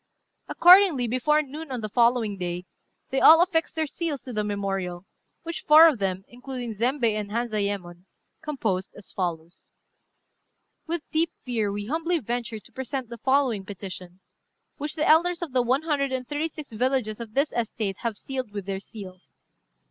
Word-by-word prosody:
Accordingly, 355 -7 +6
before 300 +6 +2
noon 295 +1 -8
on 250 -3 -3
the 215 - -3
following 235 -1 +2
day, 180 -1 -4 0.5
they 270 - +1
all 325 +1 +9
affixed 345 -2 +1
their 320 -1 0
seals 300 -2 -4
to 250 - -7
the 210 -1 0
memorial, 195 -3 -3 0.4
which 335 0 -5
four 310 +2 +8
of 295 -8 +1
them, 190 -1 -1
including 245 -1 -6
Zembei 240 +2 +1
and 210 -1 -3
Hanzayémon, 200 -6 -3 0.4
composed, 225 - -2
as 205 - -13
follows: 170 -2 -5 1.1
"With 335 -1 -2
deep 325 +1 +1
fear 225 -5 -1
we 205 0 -4
humbly 330 +7 0
venture 235 -3 -4
to - - -19
present 265 -1 -5
the 235 -1 -8
following 260 -4 +2
petition, 185 -2 -8 0.6
which 295 0 -4
the 310 - 0
elders 345 +2 +4
of 325 - -5
the 255 - +4
one 255 +5 +1
hundred 285 -4 0
and 255 -1 -3
thirty 295 +2 -1
six 305 -4 -10
villages 240 -1 0
of 225 -2 -8
this 280 +2 +1
estate 220 -4 -2
have 230 -4 -3
sealed 260 -1 -5
with 205 -2 -5
their 195 -1 -3
seals. 195 -3 -12
240 Hz, 170 wpm, -25 LUFS, 205-295 Hz, 1.1 s, all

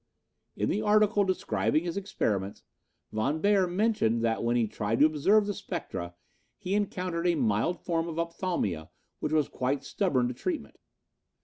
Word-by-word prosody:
In - - -1
the 210 - 0
article 210 -1 +4
describing 185 -4 0
his 170 -1 -3
experiments, 105 - -2 0.5
Von 135 +9 0
Beyer 200 0 +3
mentions 175 - +1
that 115 0 0
when 120 +1 +1
he 115 -2 +2
tried 105 +1 -2
to 150 - +6
observe 175 +8 +3
the 205 - -2
spectra, 165 - -5 0.4
he 185 - -3
encountered 180 -4 -1
a 175 - +3
mild 115 - +1
form 165 -1 -1
of 165 -1 -5
opthalmia 170 - -2 0.3
which 150 - -2
was 155 -2 +2
quite 130 +2 -2
stubborn 135 -12 +1
to 125 - -3
treatment. 320 - -4
165 Hz, 155 wpm, -29 LUFS, 120-195 Hz, 0.5 s, to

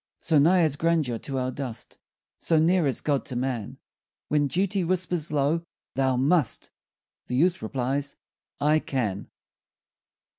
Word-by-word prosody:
So 160 -3 +3
nigh 175 +4 +5
is 150 -3 +1
grandeur 155 -8 +1
to 135 -2 -5
our 130 0 -1
dust, 125 -4 -7 0.4
So 165 - +1
near 165 0 +3
is 135 - -1
God 145 -3 0
to 130 - -4
man, 125 -4 -3 0.5
When 145 -1 +2
duty 190 +4 0
whispers 175 -2 -1
low, 150 +3 +1 0.3
Thou 130 -1 +1
must, 140 +2 +1 0.6
The 125 - -2
youth 175 +7 +2
replies, 135 +5 -2 0.4
I 150 +2 +3
can. 110 -10 -3
145 Hz, 140 wpm, -26 LUFS, 130-165 Hz, 0.6 s, nigh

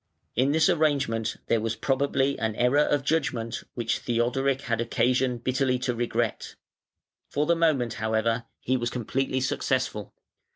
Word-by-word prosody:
In 130 +4 +3
this 160 +3 +4
arrangement 140 - +1
there 115 - +1
was 110 0 -1
probably 140 +1 +1
an 110 -1 -1
error 125 +5 +3
of 145 -2 +2
judgment 140 -7 -1
which 115 -2 -1
Theodoric 130 +3 0
had 115 -2 -1
occasion 125 +1 +1
bitterly 130 +1 0
to 125 0 -1
regret. 120 -1 -2 0.7
For 145 +1 0
the 170 - +3
moment, 145 -9 +2
however, 110 +2 0 0.2
he 130 +1 +1
was 120 -1 -1
completely 130 +2 -1
successful. 130 -5 -1
125 Hz, 140 wpm, -26 LUFS, 115-140 Hz, 0.7 s, this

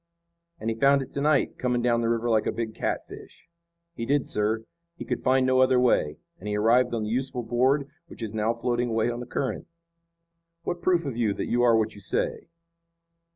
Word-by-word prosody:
"And 115 +1 -2
he - - -3
found 140 +3 +4
it - - -13
to 140 - -3
night, 150 -2 +1
coming 125 -1 0
down 120 -1 +2
the 115 - 0
river 115 0 0
like 110 -2 +2
a - - +1
big 115 -2 -4
catfish." - - -6 0.5
"He 115 - -6
did, 140 +3 +1
sir. 110 +2 -1 0.3
He - - -7
could - - -2
find 130 0 +2
no 130 0 +3
other 130 -1 +4
way, 80 -12 +2 0.2
and 105 - -8
he 105 0 -1
arrived 120 +3 +3
on 110 - -2
the 105 - -3
useful 125 0 -2
board 130 +5 +1 0.2
which 120 - -9
is 110 -1 -5
now 110 +1 +1
floating 120 0 -1
away 115 +1 +1
on 120 - -5
the 125 - -7
current." 135 - -3 1.0
"What 175 0 -3
proof 175 -2 +2
have 135 -6 -4
you 110 -4 +1
that - - -3
you 120 - +1
are 120 -2 +5
what 110 0 0
you 100 - -13
say." 100 - -2
120 Hz, 215 wpm, -26 LUFS, 115-130 Hz, 1.0 s, are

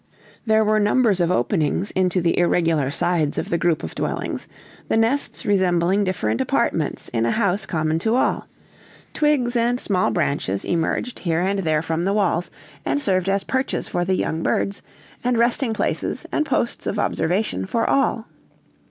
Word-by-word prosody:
There 220 0 +4
were 215 0 +3
numbers 210 -1 +3
of 170 - +2
openings 180 - 0
into 185 -1 +1
the 170 0 +1
irregular 165 -5 +2
sides 155 0 0
of - - -3
the 170 - +2
group 170 - +1
of 80 - -5
dwellings, - - -3 0.4
the - - +1
nests 230 +6 0
resembling 185 0 +2
different 115 - -1
apartments - - -1
in 115 -1 -1
a 115 - +1
house 195 - 0
common 155 -2 0
to 220 +6 +1
all; 255 - +1 0.7
twigs 280 -5 +1
and 240 +1 +1
small 185 -6 +1
branches 140 - -1
emerged 175 +8 -1
here 170 -2 0
and 195 +2 0
there 155 -4 +1
from 165 +1 -1
the 195 - +1
walls, 175 -4 +1 0.3
and 140 +1 0
served 185 +3 +1
as 195 0 +1
perches 260 0 -2
for 175 - -1
the 185 +1 +1
young 160 -2 -1
birds, 200 +3 -1 0.4
and 245 -1 +1
resting 235 +1 +2
places 220 - -2
and 305 - 0
posts 235 - -1
of 210 - -2
observation 170 - -1
for 230 - 0
all. 250 -4 +1
185 Hz, 170 wpm, -22 LUFS, 165-220 Hz, 0.7 s, There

